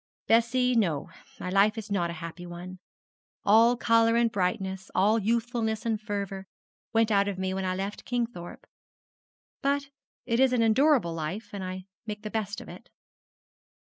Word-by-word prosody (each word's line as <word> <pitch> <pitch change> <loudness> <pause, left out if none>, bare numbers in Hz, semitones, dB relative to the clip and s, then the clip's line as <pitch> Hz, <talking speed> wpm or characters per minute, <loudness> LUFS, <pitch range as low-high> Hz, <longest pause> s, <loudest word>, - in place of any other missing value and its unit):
Bessie; 240 +2 +3
no, 170 -11 0 0.3
my 180 - -4
life 205 +3 +4
is 215 -1 -6
not 175 -4 +1
a - - -4
happy 170 +2 -8
one. 180 +2 -8 0.7
All 230 +4 +6
colour 230 -1 +4
and 235 -1 +3
brightness, 190 0 -2
all 210 +4 +4
youthfulness 225 0 -1
and 220 -2 0
fervour, 200 -2 -4 0.4
went 225 -1 +3
out 200 -1 +3
of 200 -2 -2
me 190 0 -2
when 190 0 -2
I 185 0 0
left 195 +2 -4
Kingthorpe; 235 -8 -4 1.0
but 280 0 0 0.3
it 230 -1 0
is 265 -1 +4
an 235 -2 +3
endurable 240 - +3
life, 165 +7 -4
and 200 -2 -4
I 185 0 -5 0.2
make 210 0 -5
the 215 - -5
best 215 -2 -3
of - - -11
it.' - - -12
210 Hz, 165 wpm, -28 LUFS, 185-230 Hz, 1.0 s, All